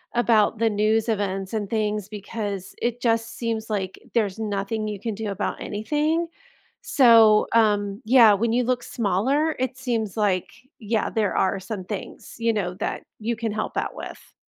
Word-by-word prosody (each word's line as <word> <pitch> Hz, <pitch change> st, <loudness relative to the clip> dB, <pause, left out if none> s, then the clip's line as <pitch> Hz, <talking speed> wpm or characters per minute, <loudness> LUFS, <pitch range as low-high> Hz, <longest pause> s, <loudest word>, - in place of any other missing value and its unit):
about 230 Hz, -2 st, +3 dB
the 230 Hz, -1 st, +3 dB
news 215 Hz, +2 st, +1 dB
events 195 Hz, -2 st, -2 dB
and 210 Hz, -2 st, -2 dB
things 210 Hz, -2 st, -1 dB
because 205 Hz, -2 st, -5 dB
it 240 Hz, 0 st, -1 dB
just 230 Hz, -1 st, 0 dB
seems 225 Hz, -2 st, -3 dB
like 190 Hz, -3 st, -3 dB
there's 215 Hz, -3 st, 0 dB
nothing 215 Hz, +1 st, -2 dB
you 210 Hz, -2 st, -4 dB
can 225 Hz, -2 st, -3 dB
do 215 Hz, 0 st, -4 dB
about 195 Hz, -, -3 dB
anything, 300 Hz, +10 st, -1 dB, 0.6 s
so, 225 Hz, -5 st, +6 dB
um 205 Hz, -1 st, +2 dB
yeah, 230 Hz, -3 st, +7 dB
when 225 Hz, +3 st, +1 dB
you 245 Hz, +1 st, +2 dB
look 250 Hz, -1 st, 0 dB
smaller, 255 Hz, -, 0 dB
it 260 Hz, 0 st, -2 dB
seems 230 Hz, -7 st, -2 dB
like 195 Hz, -4 st, +1 dB, 0.3 s
yeah, 220 Hz, 0 st, -1 dB
there 215 Hz, -3 st, 0 dB
are 190 Hz, +1 st, +2 dB
some 190 Hz, 0 st, -6 dB
things, 205 Hz, 0 st, -7 dB
you 230 Hz, 0 st, +2 dB
know, 190 Hz, -4 st, -2 dB
that 200 Hz, -, -3 dB, 0.2 s
you 230 Hz, +2 st, -1 dB
can 225 Hz, -2 st, -2 dB
help 215 Hz, -, -3 dB
out -, -, -2 dB
with. -, -, -10 dB
220 Hz, 170 wpm, -24 LUFS, 205-230 Hz, 0.6 s, yeah